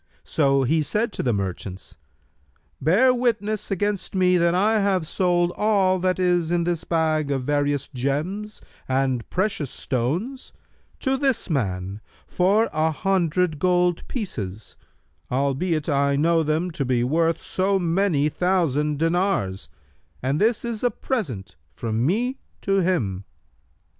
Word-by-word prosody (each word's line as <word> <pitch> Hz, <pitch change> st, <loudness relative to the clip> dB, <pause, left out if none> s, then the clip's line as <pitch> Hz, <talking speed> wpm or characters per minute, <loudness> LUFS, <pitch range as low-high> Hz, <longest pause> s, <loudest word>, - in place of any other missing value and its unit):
So 135 Hz, -2 st, +2 dB
he 155 Hz, +5 st, +2 dB
said 210 Hz, +10 st, -1 dB
to -, -, -4 dB
the 125 Hz, -, +1 dB
merchants, 95 Hz, -3 st, -4 dB, 0.9 s
'Bear 205 Hz, -, +4 dB
witness 220 Hz, -4 st, -1 dB
against 200 Hz, 0 st, -2 dB
me 180 Hz, -1 st, +4 dB
that 170 Hz, 0 st, +3 dB
I 215 Hz, +4 st, +3 dB
have 190 Hz, -5 st, +1 dB
sold 175 Hz, -1 st, +1 dB
all 195 Hz, -3 st, +2 dB
that 185 Hz, 0 st, +1 dB
is 175 Hz, -3 st, +1 dB
in 175 Hz, 0 st, +1 dB
this 170 Hz, -1 st, -1 dB
bag 155 Hz, -3 st, 0 dB
of 135 Hz, -2 st, -1 dB
various 145 Hz, 0 st, 0 dB
gems 155 Hz, +11 st, -3 dB, 0.3 s
and 130 Hz, -2 st, 0 dB
precious 185 Hz, -, -1 dB
stones 170 Hz, -, -3 dB, 0.5 s
to 265 Hz, 0 st, +1 dB
this 265 Hz, -9 st, 0 dB
man 100 Hz, -, -2 dB, 0.2 s
for 200 Hz, +5 st, +2 dB
an 160 Hz, +1 st, +2 dB
hundred 180 Hz, -3 st, 0 dB
gold 180 Hz, 0 st, +1 dB
pieces, 110 Hz, -, -5 dB, 0.6 s
albeit 140 Hz, +5 st, 0 dB
I 140 Hz, -2 st, +2 dB
know 165 Hz, +3 st, +3 dB
them 160 Hz, +3 st, 0 dB
to 150 Hz, -, -2 dB
be 125 Hz, -2 st, +1 dB
worth 165 Hz, +5 st, +1 dB
so 195 Hz, +1 st, 0 dB
many 170 Hz, -4 st, +1 dB
thousand 150 Hz, -4 st, +1 dB
dinars, 165 Hz, -, 0 dB, 0.5 s
and 135 Hz, +3 st, 0 dB
this 225 Hz, +2 st, +2 dB
is 235 Hz, -1 st, -4 dB
a 245 Hz, -, +4 dB
present 155 Hz, -, -4 dB, 0.2 s
from 115 Hz, +3 st, -2 dB
me 240 Hz, -, 0 dB, 0.2 s
to 195 Hz, 0 st, +1 dB
him.' 115 Hz, -, 0 dB
170 Hz, 135 wpm, -23 LUFS, 140-195 Hz, 0.9 s, Bear